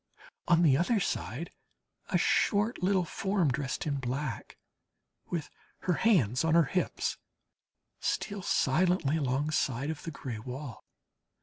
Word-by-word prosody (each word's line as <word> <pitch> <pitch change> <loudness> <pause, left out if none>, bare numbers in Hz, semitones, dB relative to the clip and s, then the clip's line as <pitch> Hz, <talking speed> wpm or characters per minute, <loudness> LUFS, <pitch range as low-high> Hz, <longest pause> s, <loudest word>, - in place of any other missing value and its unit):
On 175 -1 +5
the 145 -5 +6
other 205 +7 +2
side, 165 - -3 0.6
a - - +3
short 210 +2 +2
little 185 -1 +2
form, 190 -4 0
dressed 135 0 -2
in 145 -2 -1
black, 130 0 -4 0.7
with 165 -4 -2 0.3
her 180 - +1
hands 155 - +3
on 160 0 +3
her 170 - +7
hips, 180 +5 -1 0.8
steals 200 -3 -2
silently 160 0 +2
alongside 140 -1 0
of 155 - -7
the - - -5
gray 130 -7 -6
wall. 130 +2 -7
155 Hz, 125 wpm, -30 LUFS, 135-180 Hz, 0.8 s, her